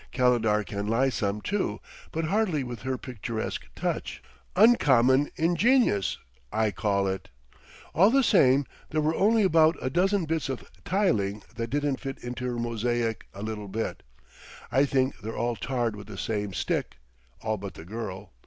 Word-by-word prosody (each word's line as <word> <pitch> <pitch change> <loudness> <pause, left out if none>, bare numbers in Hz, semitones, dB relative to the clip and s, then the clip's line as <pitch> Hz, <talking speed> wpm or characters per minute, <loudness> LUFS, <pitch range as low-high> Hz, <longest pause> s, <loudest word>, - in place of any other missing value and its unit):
"Calendar 115 -4 +2
can 100 0 -4
lie 120 +5 +2
some, 105 -3 -2
too; 205 - -1 0.3
but 160 0 -2
hardly 185 -5 +1
with 120 -2 -7
her 130 0 -2
picturesque 115 -2 -5
touch.... - - -3 0.4
Uncommon 145 - +5
ingenious, 175 - +3 0.3
I 110 -1 +1
call 100 0 0
it. 95 0 -3 0.6
All 190 +6 +6
the 270 +3 +4
same, 140 - +5 0.2
there 155 - 0
were 155 +1 +2
only 215 +5 +3
about 165 -3 +5
a 130 - -2
dozen 190 +3 +2
bits 160 -3 -1
of 130 - -5 0.2
tiling 105 - +1
that 115 0 -3
didn't 145 0 0
fit 135 -2 -5
into 125 +1 -5
her 125 -1 -2
mosaic 115 0 -1
a 100 - -6
little 110 -2 -4
bit.... 110 +4 -3 0.7
I 135 +2 +4
think 130 -1 0
they're 110 0 -6
all 120 +1 0
tarred 120 -3 -1
with 100 -1 -10
the 105 -3 -9
same 105 0 -2
stick - - -2 0.5
all 110 -1 0
but 100 0 -7
the 80 - -10
girl. 100 -1 -6
125 Hz, 160 wpm, -27 LUFS, 110-155 Hz, 0.7 s, All